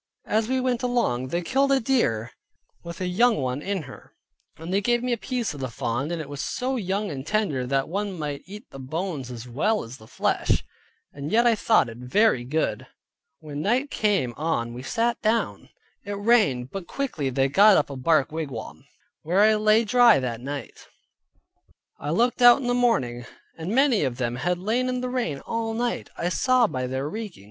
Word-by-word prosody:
As 220 Hz, +1 st, 0 dB
we 260 Hz, +1 st, 0 dB
went 250 Hz, -2 st, 0 dB
along 235 Hz, -, 0 dB
they 170 Hz, +6 st, -2 dB
killed 275 Hz, +8 st, +1 dB
a 270 Hz, -, +4 dB
deer, 170 Hz, -, 0 dB, 0.5 s
with 170 Hz, +1 st, -8 dB
a -, -, 0 dB
young 235 Hz, +7 st, +3 dB
one 130 Hz, 0 st, -2 dB
in 195 Hz, -1 st, -2 dB
her, 135 Hz, -2 st, -13 dB, 0.4 s
they 180 Hz, +5 st, -1 dB
gave 240 Hz, +3 st, +1 dB
me 250 Hz, -1 st, 0 dB
a -, -, +2 dB
piece 235 Hz, -, -3 dB
of 145 Hz, -, -9 dB
the 130 Hz, -1 st, -3 dB
fawn, 120 Hz, +5 st, -2 dB
and 170 Hz, -1 st, -3 dB
it 155 Hz, -, -6 dB
was 145 Hz, 0 st, -6 dB
so 260 Hz, +1 st, -2 dB
young 200 Hz, -2 st, -2 dB
and 135 Hz, -2 st, -5 dB
tender, 155 Hz, -8 st, -1 dB
that 135 Hz, +1 st, 0 dB
one 195 Hz, +2 st, -3 dB
might 145 Hz, -3 st, -4 dB
eat 210 Hz, +4 st, -10 dB
the 135 Hz, -, -10 dB
bones 150 Hz, 0 st, -4 dB
as 120 Hz, 0 st, -8 dB
well 210 Hz, -, 0 dB
as 115 Hz, +3 st, -10 dB
the 110 Hz, -, -16 dB
flesh, -, -, 0 dB, 0.5 s
and 140 Hz, +2 st, -6 dB
yet 235 Hz, +2 st, +4 dB
I 235 Hz, -, +5 dB
thought 220 Hz, -, +3 dB
it 115 Hz, 0 st, -9 dB
very 130 Hz, -, +2 dB
good. 150 Hz, +6 st, -2 dB, 0.5 s
When 150 Hz, -2 st, -6 dB
night 250 Hz, -, 0 dB
came 195 Hz, -, +1 dB
on 130 Hz, -7 st, -1 dB
we 125 Hz, -, -7 dB
sat 235 Hz, -, -1 dB
down; 225 Hz, +1 st, -1 dB, 0.3 s
it 205 Hz, -, -5 dB
rained, 200 Hz, -, +2 dB
but 195 Hz, -, -3 dB
they 180 Hz, -, -13 dB
quickly 175 Hz, -, -2 dB
got 140 Hz, +11 st, +5 dB
up 145 Hz, -, 0 dB
a -, -, -5 dB
bark 155 Hz, +2 st, +2 dB
wigwam, 145 Hz, -8 st, -6 dB, 0.4 s
where 180 Hz, +5 st, +2 dB
I 215 Hz, +1 st, +6 dB
lay 215 Hz, +1 st, +3 dB
dry 240 Hz, 0 st, +6 dB
that 120 Hz, -3 st, -4 dB
night. 140 Hz, +2 st, -7 dB, 1.1 s
I 145 Hz, -, -5 dB
looked 240 Hz, +10 st, +1 dB
out 245 Hz, +1 st, +8 dB
in 265 Hz, -, -5 dB
the 245 Hz, -, +1 dB
morning, 130 Hz, -, +1 dB, 0.3 s
and 165 Hz, +2 st, -6 dB
many 255 Hz, -, +3 dB
of 130 Hz, -3 st, -2 dB
them 120 Hz, -1 st, -2 dB
had 175 Hz, +7 st, 0 dB
lain 230 Hz, +7 st, 0 dB
in 250 Hz, 0 st, -2 dB
the 250 Hz, -, -3 dB
rain 235 Hz, -, -2 dB
all 225 Hz, -1 st, -3 dB
night, 240 Hz, +1 st, -2 dB
I 175 Hz, -, -1 dB
saw 255 Hz, +5 st, +3 dB
by 130 Hz, -, -3 dB
their 130 Hz, +2 st, -3 dB
reeking. 210 Hz, +2 st, -6 dB
180 Hz, 200 wpm, -25 LUFS, -, 1.1 s, out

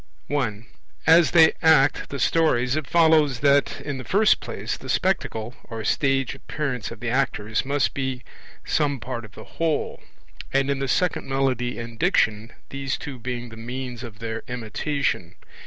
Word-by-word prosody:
I. 115 Hz, -7 st, -1 dB, 0.4 s
As 165 Hz, +1 st, +6 dB
they 160 Hz, -2 st, +6 dB
act 160 Hz, -5 st, +4 dB
the 140 Hz, -, -4 dB
stories, 135 Hz, -5 st, +2 dB
it 155 Hz, -3 st, -3 dB
follows 160 Hz, -6 st, +4 dB
that 140 Hz, 0 st, +3 dB
in 140 Hz, -3 st, -4 dB
the -, -, -6 dB
first 205 Hz, -, +3 dB
place -, -, -4 dB
the -, -, -10 dB
Spectacle 110 Hz, +2 st, 0 dB
(or 115 Hz, -1 st, -6 dB
stage 135 Hz, 0 st, +1 dB
appearance 135 Hz, -4 st, -4 dB
of 115 Hz, -2 st, -10 dB
the 120 Hz, -1 st, -2 dB
actors) 110 Hz, -4 st, 0 dB
must 140 Hz, 0 st, 0 dB
be 130 Hz, -2 st, -3 dB, 0.4 s
some 145 Hz, -3 st, +1 dB
part 120 Hz, -1 st, -5 dB
of 110 Hz, -, -16 dB
the -, -, -10 dB
whole; 165 Hz, -2 st, -2 dB, 0.5 s
and 135 Hz, +1 st, +2 dB
in 140 Hz, -, -1 dB
the 135 Hz, -, -1 dB
second 180 Hz, +6 st, 0 dB
Melody 130 Hz, -2 st, 0 dB
and 115 Hz, -1 st, -7 dB
Diction, 115 Hz, -, +2 dB, 0.2 s
these 135 Hz, -1 st, -3 dB
two 135 Hz, -3 st, -7 dB
being 120 Hz, 0 st, -5 dB
the 110 Hz, -, -11 dB
means 125 Hz, +1 st, -6 dB
of 115 Hz, -4 st, -9 dB
their 115 Hz, 0 st, -4 dB
imitation. 125 Hz, -, -2 dB
130 Hz, 165 wpm, -24 LUFS, 115-145 Hz, 0.5 s, As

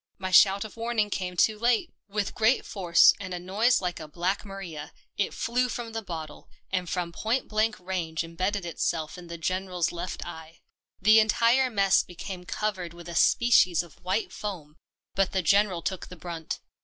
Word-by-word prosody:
My 185 Hz, -1 st, -4 dB
shout 195 Hz, +2 st, +6 dB
of 220 Hz, -, -11 dB
warning 225 Hz, -2 st, 0 dB
came 180 Hz, -2 st, -3 dB
too 215 Hz, +4 st, +3 dB
late. 235 Hz, 0 st, +1 dB
With 205 Hz, -1 st, -2 dB
great 225 Hz, +4 st, +2 dB
force 180 Hz, -4 st, +5 dB
and 185 Hz, -2 st, -5 dB
a -, -, -4 dB
noise 205 Hz, +8 st, +2 dB
like 180 Hz, -2 st, -3 dB
a 155 Hz, -, -8 dB
black 180 Hz, +6 st, -2 dB
Maria, 185 Hz, -7 st, -8 dB, 0.2 s
it 200 Hz, -, 0 dB
flew 250 Hz, +2 st, 0 dB
from 235 Hz, -1 st, -5 dB
the 225 Hz, -, -3 dB
bottle, 160 Hz, -6 st, -8 dB, 0.2 s
and 185 Hz, -2 st, -1 dB
from 175 Hz, -1 st, -2 dB
point 225 Hz, +8 st, -1 dB
blank 215 Hz, +1 st, 0 dB
range 175 Hz, -3 st, -3 dB
imbedded 185 Hz, +4 st, -2 dB
itself 160 Hz, -1 st, -2 dB
in 175 Hz, -, -11 dB
the 170 Hz, 0 st, -7 dB
General's 185 Hz, 0 st, -1 dB
left 175 Hz, +1 st, -5 dB
eye. 160 Hz, 0 st, -10 dB, 0.4 s
The 215 Hz, +3 st, +6 dB
entire 235 Hz, +4 st, +3 dB
mess 195 Hz, -5 st, +3 dB
became 180 Hz, +1 st, -8 dB
covered 185 Hz, -5 st, -3 dB
with 175 Hz, 0 st, -11 dB
a 170 Hz, -, -6 dB
species 185 Hz, -3 st, +4 dB
of 170 Hz, -4 st, -17 dB
white 185 Hz, +5 st, -1 dB
foam, 170 Hz, -8 st, -6 dB, 0.4 s
but 195 Hz, -1 st, +1 dB
the 190 Hz, -1 st, 0 dB
General 195 Hz, -1 st, +3 dB
took 190 Hz, -2 st, -3 dB
the 180 Hz, -, -10 dB
brunt. 165 Hz, -1 st, -6 dB
185 Hz, 180 wpm, -27 LUFS, 170-215 Hz, 0.4 s, shout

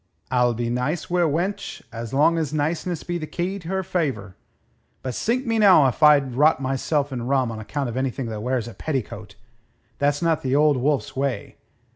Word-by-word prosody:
"I'll 125 Hz, -1 st, +2 dB
be 120 Hz, 0 st, -2 dB
nice 140 Hz, +9 st, -2 dB
wi' 180 Hz, 0 st, +2 dB
a 170 Hz, -, +4 dB
wench 175 Hz, +7 st, -3 dB
as 115 Hz, -1 st, -6 dB
long 155 Hz, +5 st, +3 dB
as 155 Hz, -3 st, -2 dB
niceness 160 Hz, +3 st, -2 dB
be 175 Hz, 0 st, -3 dB
the 155 Hz, -, -5 dB
key 185 Hz, +5 st, -3 dB
to 165 Hz, -, -11 dB
her 190 Hz, +1 st, -1 dB
favour. 135 Hz, -, -2 dB, 0.7 s
But 130 Hz, -, -3 dB
sink 245 Hz, -, -1 dB
me 225 Hz, -1 st, 0 dB
now 185 Hz, -8 st, +7 dB
if 130 Hz, +4 st, -1 dB
I'd 145 Hz, -4 st, +5 dB
rot 150 Hz, +3 st, +4 dB
myself 135 Hz, +2 st, -1 dB
in 120 Hz, -1 st, -4 dB
rum 130 Hz, -3 st, +1 dB
on 110 Hz, -, -6 dB
account 135 Hz, +5 st, -3 dB
of 120 Hz, -, -5 dB
anything 130 Hz, 0 st, -2 dB
that 110 Hz, -2 st, -5 dB
wears 125 Hz, -1 st, -1 dB
a 115 Hz, -, -8 dB
petticoat. 110 Hz, -9 st, -5 dB, 0.6 s
That's 145 Hz, +3 st, +1 dB
not 165 Hz, -2 st, +2 dB
the 130 Hz, 0 st, 0 dB
Old 150 Hz, -1 st, +4 dB
Wolf's 140 Hz, +2 st, -1 dB
way. 135 Hz, -1 st, -3 dB
140 Hz, 200 wpm, -23 LUFS, 125-165 Hz, 0.7 s, now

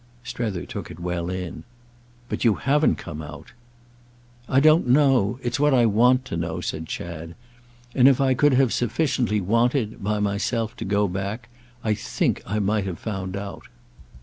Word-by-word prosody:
Strether 105 Hz, -8 st, -4 dB
took -, -, -7 dB
it 80 Hz, -, -10 dB
well 90 Hz, 0 st, -3 dB
in. 90 Hz, -1 st, -5 dB, 0.6 s
"But -, -, -3 dB
you 115 Hz, -4 st, +4 dB
haven't 145 Hz, +3 st, +2 dB
come 80 Hz, -3 st, -7 dB
out!" 75 Hz, +1 st, -10 dB, 1.0 s
"I 130 Hz, -, +4 dB
don't 155 Hz, +1 st, +5 dB
know—it's 125 Hz, -2 st, +2 dB
what 145 Hz, -1 st, +4 dB
I 120 Hz, -2 st, +5 dB
want 125 Hz, +4 st, +4 dB
to 105 Hz, -, -5 dB
know," 85 Hz, 0 st, -3 dB
said 80 Hz, -2 st, -4 dB
Chad. 85 Hz, 0 st, -6 dB, 0.6 s
"And 130 Hz, -1 st, +5 dB
if 135 Hz, -2 st, +5 dB
I 135 Hz, -1 st, +3 dB
could 145 Hz, +2 st, +3 dB
have 130 Hz, -3 st, +3 dB
sufficiently 120 Hz, -3 st, 0 dB
wanted—by 110 Hz, 0 st, 0 dB
myself—to 105 Hz, +2 st, -2 dB
go 100 Hz, +1 st, +1 dB
back, 100 Hz, +6 st, -4 dB, 0.3 s
I 110 Hz, -, +1 dB
think -, -, -1 dB
I 105 Hz, -, -1 dB
might 105 Hz, 0 st, 0 dB
have 90 Hz, -3 st, -4 dB
found 95 Hz, -3 st, -4 dB
out." 100 Hz, 0 st, -7 dB
105 Hz, 155 wpm, -24 LUFS, 95-125 Hz, 1.0 s, don't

